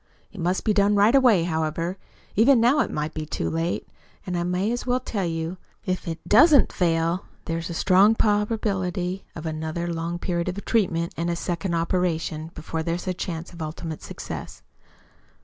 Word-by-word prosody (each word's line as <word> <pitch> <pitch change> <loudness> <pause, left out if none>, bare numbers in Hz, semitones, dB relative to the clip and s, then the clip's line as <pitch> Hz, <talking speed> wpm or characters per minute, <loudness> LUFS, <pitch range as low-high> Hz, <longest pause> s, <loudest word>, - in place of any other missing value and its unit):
It 205 - -11
must 180 +3 0
be 215 - +2
done 205 0 +3
right 205 +4 +5
away, 245 -10 +5
however. 165 +2 -2 0.4
Even 240 +4 +6
now 245 +6 +4
it - - +2
may 150 0 -2
be 155 - -5
too 155 - -3
late. 165 +2 -2 0.4
And 180 - -3
I 175 - 0
may 180 +5 0
as 245 +1 -3
well 250 +1 +2
tell 205 -7 -2
you, 165 +2 -3 0.3
if 185 -1 -2
it 165 -1 -5
DOESN'T 285 +6 +6
fail 165 0 +1 0.2
there 165 0 -2
is 165 - -5
a 170 - -4
strong 195 +5 +5
probability 195 -4 0
of 165 - -7
another 160 +2 -3
long 165 +1 -3
period 175 0 -1
of 195 +3 -5
treatment 170 -7 +1
and 170 +1 -1
a 170 - 0
second 170 +1 -2
operation, 165 -2 -1
before 160 +1 -4
there's 170 +2 -2
a 185 - +1
chance 175 -1 -5
of 170 - -9
ultimate 155 0 -5
success!" - - -7
175 Hz, 185 wpm, -25 LUFS, 165-200 Hz, 0.4 s, Even